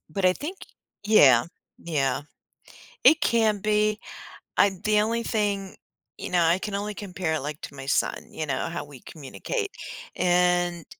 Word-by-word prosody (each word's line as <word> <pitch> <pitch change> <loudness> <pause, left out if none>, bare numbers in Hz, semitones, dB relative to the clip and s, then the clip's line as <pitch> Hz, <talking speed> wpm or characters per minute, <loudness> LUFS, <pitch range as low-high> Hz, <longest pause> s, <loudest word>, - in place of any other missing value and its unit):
But 195 +3 -3
I 185 - +6
think 335 - -6 0.5
Yeah, 140 - +6 0.3
yeah. 140 -5 -1 0.8
It 320 +1 +7
can 220 -5 +2
be, 215 +1 +1 0.6
I 200 - +6
the 210 0 +3
only 230 +2 -1
thing, 200 -4 -1 0.4
you - - -6
know 180 -1 +2
I 170 +3 +3
can 205 0 -4
only 205 +1 -3
compare 185 -5 -3
it, - - -1
like, 150 +2 -5
to - - -8
my 135 0 -8
son, - - +1 0.2
you 155 - -4
know, 135 +1 -2
how 170 -3 -5
we 140 -3 -13
communicate. 395 - -5 0.4
And 175 -1 +2
185 Hz, 160 wpm, -25 LUFS, 160-210 Hz, 0.8 s, It